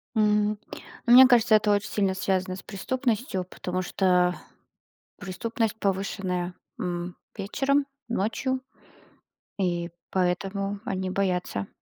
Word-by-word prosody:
М, 210 -1 +3 0.5
ну, 240 - +5
мне 260 +1 +11
кажется, 235 -3 +5
это 210 -1 +3
очень 205 +1 +1
сильно 195 -2 +1
связано 185 -1 -1
с 185 - -10
преступностью, 225 -1 -1
потому 185 0 -4
что, 180 -1 +3
а, - - -3 0.9
преступность 220 +3 -2
повышенная, 190 -2 -1 0.3
м, 175 0 -3 0.2
вечером, 270 +8 +1 0.2
ночью, 240 +4 -1 1.0
и 175 -2 0 0.2
поэтому 195 +2 -1
они 190 -1 -2
боятся. 180 - -1
195 Hz, 110 wpm, -26 LUFS, 185-215 Hz, 1.0 s, мне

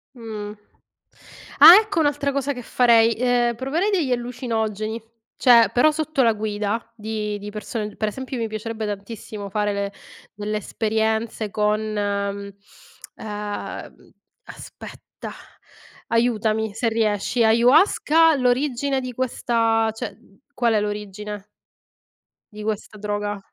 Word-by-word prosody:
Mh. 215 -3 -7 1.1
Ah, 345 - +12
ecco 415 -6 -2
un'altra 290 -2 +1
cosa 280 0 -1
che 250 - -7
farei: 230 -1 +4
ehm, 240 -1 +1
proverei 300 - -1
degli 330 -10 0
allucinogeni. 225 -3 -2 0.4
Cioè, 235 -3 +6
però 280 +6 +5
sotto 310 -2 -1
la 230 -1 +4
guida 210 +1 -3
di 210 -1 -3
di 205 +1 -7
persone 210 0 -5
per 215 - -1
esempio 260 +3 -6
mi 230 -1 -1
piacerebbe 220 0 -5
tantissimo 205 0 -6
fare 210 +1 0
le 200 0 -3 0.4
delle 210 +1 -3
esperienze 220 0 -1
con, 210 0 +1
mhmm, 200 -1 -2 0.7
uhm, 210 -1 -6 0.3
aspetta, - - -11 0.8
aiutami 220 -2 +1
se 230 +2 0
riesci. 220 +1 0
Ayahuasca, 300 - +5
l'origine 265 +1 +1
di 255 -1 -6
questa 230 -3 +1
cioè, 220 - -6 0.4
qual 240 -4 +1
è 210 - +2
l'origine 210 0 -5 1.1
di 210 0 -8
questa 215 0 -4
droga? 205 0 -3
220 Hz, 115 wpm, -22 LUFS, 210-245 Hz, 1.1 s, Ah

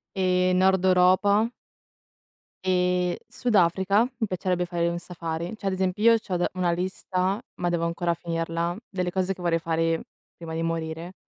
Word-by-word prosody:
Ehm, 185 -1 +2
nord 190 0 +3
Europa 190 +4 +4 1.1
ehm, 180 -1 +1
Sud 245 -1 -1
Africa, 190 +3 +4 0.2
mi 220 - 0
piacerebbe 180 -1 -1
fare 170 -1 0
un 170 0 -2
safari. 170 +1 -5
Cioè 210 - -10
ad 195 - +1
esempio, 185 +2 -1
io - - +4
c'ho 190 -4 -3
da 175 - +1
una 180 -1 +1
lista, 185 +2 -1
ma 175 - -1
devo 170 -1 0
ancora 170 +1 0
finirla, 165 0 -2
delle 180 -2 -2
cose 190 +1 0
che 185 - -12
vorrei 170 -1 +2
fare 165 0 0 0.3
prima 165 -1 -7
di 165 - -2
morire, 165 +1 -3
180 Hz, 165 wpm, -26 LUFS, 170-185 Hz, 1.1 s, Europa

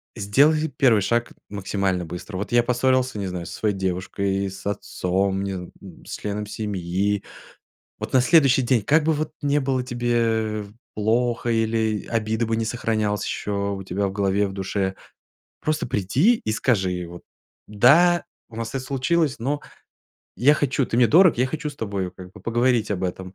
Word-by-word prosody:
сделай 145 +10 +3
первый 125 -7 +3
шаг 115 +4 0 0.2
максимально 95 -2 -1
быстро. 90 +4 -7
Вот 100 +1 -5
я 120 0 +5
поссорился, 130 0 +1
не 100 - -3
знаю, 90 -2 -5
со - - -7
своей 105 -2 -1
девушкой, 95 +1 -2
с 95 +1 -11
отцом, 95 -1 -1
не 100 -1 -3
зн 90 -1 -7 0.4
с - - -6
членом 105 0 -4
семьи. 100 -1 -2 0.8
Вот - - -6
на 130 - +6
следующий 135 -3 +5
день, 120 -2 +2
как 150 +8 +3
бы 160 - +3
вот 155 0 -2
ни 145 0 +2
было 135 -2 0
тебе 115 -4 0 0.3
плохо, 120 +3 0
или 110 -1 0
обида 110 0 0
бы 115 0 0
ни 115 - -1
сохранялась 110 -3 -1
еще 100 -1 -2
у 95 -1 -5
тебя 100 +2 -1
в - - -6
голове, 100 0 +1
в - - -7
душе, 95 0 -2 0.7
просто 155 0 -1
приди 120 - +2
и 110 - 0
скажи, 100 -6 +1
и 90 -1 -4
вот: 85 +1 -11 0.4
"Да, 160 +11 +5 0.3
у 115 - -13
нас 115 0 -4
это 135 - 0
случилось, 140 +3 0
но 140 +5 -1 0.8
я 145 +5 +5
хочу, 140 -2 0
ты - - -2
мне 120 -1 +6
дорог, 175 -3 +6
я 125 - +3
хочу 150 +2 -4
с 140 - -14
тобой, 100 -6 -3
как 90 0 -12
бы, 105 - -13
поговорить 120 +1 +1
об 95 -2 -1
этом". 95 +1 -5
110 Hz, 175 wpm, -23 LUFS, 100-130 Hz, 0.8 s, на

